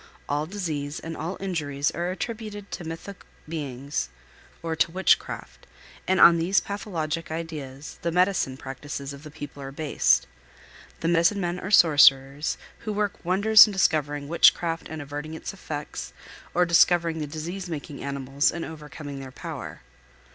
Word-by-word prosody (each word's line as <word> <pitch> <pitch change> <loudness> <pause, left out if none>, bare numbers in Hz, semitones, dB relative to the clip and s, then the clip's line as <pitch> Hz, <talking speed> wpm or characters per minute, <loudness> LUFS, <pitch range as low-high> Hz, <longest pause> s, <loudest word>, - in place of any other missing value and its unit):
All 150 +2 -1
disease 155 -7 -3
and 165 0 -6
all 165 +5 -4
injuries 150 -6 -1
are 175 +2 -2
attributed 210 0 -5
to 175 - -5
mythic 165 +4 -8 0.2
beings 140 - -4 0.5
or 165 -1 -2
to 160 - +2
witchcraft, 185 +3 0 0.4
and 190 - +2
on 170 -1 +8
these 180 +4 +3
pathologic 165 -6 -4
ideas 155 -4 -6
the 170 - -1
medicine 180 -7 +2
practices 140 +1 -6
of 140 - -11
the 155 - -10
people 145 -1 -9
are 135 0 -6
based. 150 +1 +2 0.8
The 165 - 0
medicine 170 +4 +3
men 175 -1 -2
are 190 - -5
sorcerers, 145 -5 +5 0.2
who 215 - -4
work 205 -1 -2
wonders 205 +5 +7
in 210 - -5
discovering 145 -6 +1
witchcraft 165 +1 +3
and 155 -2 -5
averting 145 +2 -6
its 160 - -6
effects 150 -6 -6 0.4
or 180 - +5
in - - 0
discovering 170 -1 +4
the 150 - -3
disease 170 +5 -5
making 145 -3 -6
animals 140 +2 0
and 170 - -4
overcoming 150 -2 -8
their 135 -1 -8
power. - - -7
160 Hz, 155 wpm, -26 LUFS, 145-180 Hz, 0.8 s, on